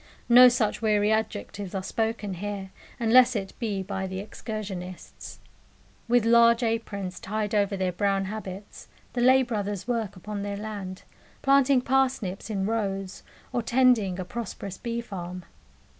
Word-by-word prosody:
No 250 +1 +9
such 235 -3 0
weary 210 -1 +2
adjectives 205 -3 -2
are 190 - -2
spoken 220 -2 -2
here, 195 +1 -5 0.3
unless 245 +2 +5
it 195 -2 -3
be 205 -5 -2
by 190 0 -3
the 190 0 -5
excursionists. 195 -3 -7 0.7
With 240 -1 +3
large 235 +1 +5
aprons 200 -5 -2
tied 215 +1 -3
over 200 -1 +1
their 185 -1 0
brown 195 +1 0
habits, 200 -1 -7 0.3
the 245 - -1
Lay 260 +2 +6
Brothers 205 -4 -3
work 230 -5 -2
upon 205 +2 -6
their 200 0 -4
land, 200 -3 -6 0.4
planting 275 -1 +4
parsnips 250 -7 0
in 195 -3 -1
rows, 195 -3 -2 0.3
or 245 - +1
tending 235 -6 +3
a 185 - -3
prosperous 200 -3 -6
bee 235 -1 -3
farm. 180 -5 -7
210 Hz, 145 wpm, -26 LUFS, 195-235 Hz, 0.7 s, No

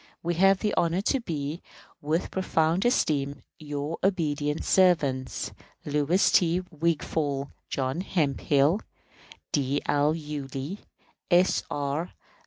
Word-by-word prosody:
We 170 +1 0
have 195 +3 +5
the 210 -1 0
honor 170 +2 +1
to 270 +6 +1
be, 160 - -4 0.4
with 155 +4 -1
profound 170 0 +1
esteem, 145 - +1 0.2
Your 150 +1 -4
obedient 150 -6 0
servants, 150 -9 +2 0.3
LOUIS 150 +5 +2
T. 175 0 +3
WIGFALL, 150 -3 -1 0.2
JOHN 135 +5 -1
HEMPHILL, 150 0 +1 0.7
D. 140 0 +1
L. 145 +2 +2
YULEE, 150 +2 -5 0.5
S. 180 +1 +4
R. 145 +4 -2
155 Hz, 105 wpm, -27 LUFS, 145-175 Hz, 0.7 s, have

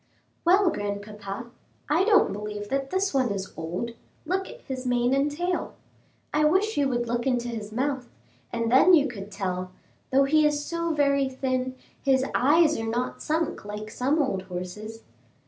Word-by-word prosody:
"Well, 370 +1 +5
grandpapa, 205 +1 -5 0.4
I 315 +6 +3
don't 425 -1 +4
believe 210 0 -5
that 275 0 -1
this 380 0 0
one 260 -3 +2
is 195 -1 -4
old; 175 +8 -4 0.3
look 380 +4 -1
at - - -11
his 260 -2 -5
mane 245 +1 +2
and 275 +2 +2
tail. 350 +4 -2 0.6
I 300 +1 +3
wish 385 +8 +3
you 280 -2 +2
would 240 -2 -1
look 240 +2 -1
into 245 -2 0
his 220 -3 -5
mouth, 260 +1 -2 0.4
and 230 -1 -1
then 345 +8 +7
you 290 -3 +4
could 205 -6 -7
tell; 185 -2 -3 0.4
though 275 +1 +4
he 305 +3 +4
is 295 -1 +1
so 335 0 -1
very 280 -3 +2
thin, 255 -1 -2 0.3
his 265 -1 +3
eyes 305 +2 +4
are 225 - -3
not 245 +2 -2
sunk 320 +1 -1
like 210 +1 -6
some 275 +8 +1
old 260 -10 0
horses." 190 +5 -7
260 Hz, 170 wpm, -26 LUFS, 215-300 Hz, 0.6 s, then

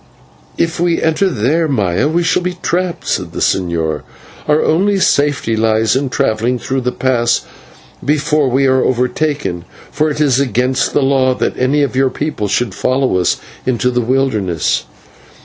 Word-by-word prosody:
"If 165 -1 -1
we 170 -1 +1
enter 160 +5 +1
there, 155 - +1
Maya, 105 - 0
we 170 +3 +1
shall 175 - +1
be 180 0 -3
trapped," 180 0 -2
said - - -2
the - - -5
señor; 85 -4 0 0.5
"our 150 0 +3
only 195 +5 +2
safety 145 -8 +1
lies 110 +1 +2
in 135 0 0
travelling 125 -2 0
through 130 +2 -2
the 125 0 -1
pass 120 -3 +1 0.6
before 150 -1 +1
we 135 +2 +2
are 130 -1 +3
overtaken, 125 - -1 0.3
for 155 +2 0
it 150 - -4
is 140 -4 +3
against 130 0 0
the - - +2
law 130 -1 +2
that - - -1
any 140 +3 +1
of 140 - -2
your 135 0 +3
people 135 -6 -3
should 105 +1 -1
follow 130 -3 0
us 90 - +1 0.3
into 125 0 0
the 125 0 0
wilderness." 110 - 0
130 Hz, 165 wpm, -15 LUFS, 115-150 Hz, 0.6 s, our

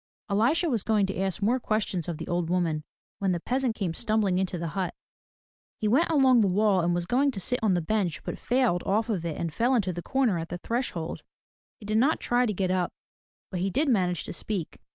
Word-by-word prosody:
Elisha 255 - +3
was 240 -8 +1
going 215 -2 +2
to 195 -1 -4
ask 195 +1 -1
more 245 +5 +2
questions 210 -7 -1
of 170 -3 -3
the - - -7
old 175 -1 -1
woman, 170 -4 0 0.4
when 195 -2 +1
the 175 - -1
peasant 250 +3 0
came 185 -7 -2
stumbling 210 -2 +1
into 190 -1 -1
the 170 -1 -3
hut. 185 0 -3 0.8
He 215 - -1
went 275 +11 +3
along 265 -6 +5
the 205 - +3
wall 195 0 +3
and 175 +1 +1
was 175 0 -1
going 265 +9 +2
to 235 -8 -4
sit 250 +6 -1
on 210 -4 +3
the 175 - 0
bench 185 -3 -1
but - - -5
failed 245 -8 +1
of 220 +4 0
it 165 -3 -3
and 165 -2 -3
fell 245 +9 +2
into 190 -6 +1
the 175 - -5
comer 245 -5 +1
at 165 0 -5
the 175 - -4
threshold. 180 -6 -3 0.6
He 215 - -11
did 215 +1 +1
not 285 +7 +3
try 245 0 +2
to - - 0
get 185 -1 0
up, 185 -1 0 0.6
but 185 - -3
he 190 +2 0
did 280 - +1
manage 180 -7 +1
to - - -6
speak. 185 -2 -4
200 Hz, 230 wpm, -27 LUFS, 175-240 Hz, 0.8 s, along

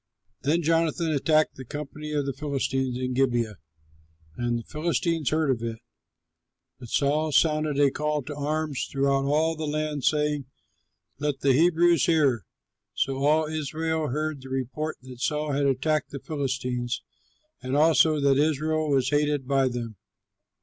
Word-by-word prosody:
Then 165 +5 +1
Jonathan 165 0 +1
attacked 155 +1 +2
the 130 - -7
company 150 +3 -7
of 145 -2 0
the 140 - -2
Philistines 135 -2 -2
in 130 0 -2
Gibeah; 120 -6 0 0.8
and 120 -1 -1
the 115 - -6
Philistines 165 0 -1
heard 155 -2 +1
of 120 -3 -1
it. 115 -1 -3 1.0
But 120 -3 -10
Saul 150 +4 +1
sounded 155 -1 +2
a 140 -2 +5
call 150 0 -1
to 145 +3 -7
arms 150 -1 -2
throughout 135 0 +1
all 155 +3 +2
the 155 -1 -4
land, 150 -2 -2
saying, 150 -1 +1 0.7
"Let 145 -1 -2
the 135 -1 +4
Hebrews 170 +1 +4
hear!" 140 - +2 0.5
So 135 0 0
all 150 +3 +3
Israel 155 +1 -2
heard 150 +1 -2
the 130 - -10
report 135 +4 -3
that 125 -1 -11
Saul 150 +2 -1
had 140 0 +1
attacked 145 +3 0
the 140 - -6
Philistines, 125 -4 -3 0.6
and 130 +2 -2
also 155 0 +4
that 140 -1 +4
Israel 155 +1 +1
was 135 -2 +2
hated 145 -2 +1
by 135 -1 +3
them. 120 -4 -5
145 Hz, 150 wpm, -26 LUFS, 135-155 Hz, 1.0 s, a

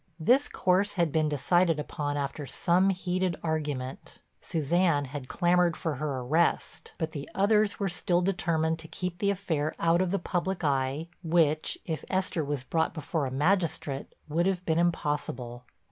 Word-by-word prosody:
This 250 - +4
course 190 +3 +1
had 170 -5 +1
been 155 0 +2
decided 165 +3 +2
upon 145 -1 -3
after 140 0 -3
some 180 +7 +2
heated 185 -1 0
argument. 145 -5 -3 0.2
Suzanne 165 -1 +1
had 135 -1 -7
clamored 175 0 +2
for 160 -6 -2
her 140 -3 -2
arrest, 155 +7 0
but 160 -1 -2
the 145 -3 -6
others 210 +1 +3
were 200 - 0
still 175 -1 +1
determined 165 -4 0
to 160 - -8
keep 180 +1 -5
the 200 - +2
affair 165 -7 -1
out 170 +1 +3
of 185 - +1
the 200 - +1
public 180 0 -2
eye, 140 +2 0
which, 160 -2 +2
if 160 -2 -3
Esther 185 -4 0
was 145 -2 -3
brought 160 +5 0
before 155 -1 -2
a - - -5
magistrate, 150 -2 0 0.2
would 165 +4 +1
have 185 -2 -1
been 160 0 +2
impossible. 145 -7 -1
165 Hz, 160 wpm, -28 LUFS, 145-180 Hz, 0.2 s, This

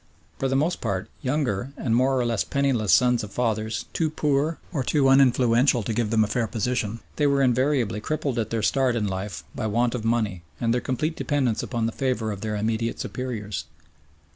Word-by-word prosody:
For 135 - +1
the 135 - 0
most 155 +6 +1
part 95 0 -2
younger 130 -3 -1
and 115 -3 0
more 130 +2 +3
or 125 - +1
less 115 -3 +1
penniless 135 -7 +1
sons 125 -2 +4
of 105 - -7
fathers 110 -2 -1
too 160 -2 +1
poor 150 +1 0 0.2
or 140 -5 0
too 140 +1 +2
uninfluential 125 -2 +4
to 115 - -1
give 115 -1 0
them 110 0 +3
a - - 0
fair 115 +1 0
position, 115 0 -2 0.2
they 150 - +3
were 140 -1 +3
invariably 125 -4 +1
crippled 140 -2 -2
at 110 -1 -1
their 115 -2 -2
start 130 0 +2
in 110 -3 0
life 95 0 -4
by 110 - -3
want 115 +3 +1
of 125 -3 -3
money 110 -6 0 0.2
and 115 0 +1
their 125 - 0
complete 155 +5 -2
dependence 135 -9 0
upon 120 -2 -2
the 115 - 0
favour 120 -4 -1
of 100 -2 -6
their 110 -1 -2
immediate 110 +2 -1
superiors. 105 - -4
120 Hz, 200 wpm, -25 LUFS, 110-135 Hz, 0.2 s, sons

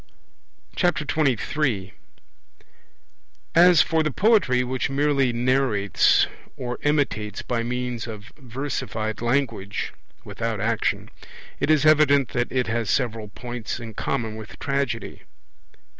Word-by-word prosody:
23 150 - 0 1.6
As 175 -1 +7
for 160 -1 +1
the 155 - 0
poetry 175 - +3
which 130 +1 -2
merely 140 -2 +2
narrates, 120 -4 +3 0.3
or 125 -3 -4
imitates 140 -9 0
by 120 -2 -1
means 125 0 -3
of 105 -1 -9
versified 125 -5 -4
language 120 -5 -1 0.3
(without 115 -2 -3
action), 115 +2 -1 0.5
it 140 - 0
is 155 -1 +4
evident 145 -4 +5
that 120 -1 -2
it 125 -1 +1
has 115 -2 -2
several 115 -3 0
points 120 +2 -6
in 115 -2 -8
common 115 0 -2
with 110 0 -10
Tragedy. 140 -5 -2
125 Hz, 110 wpm, -24 LUFS, 115-140 Hz, 1.6 s, As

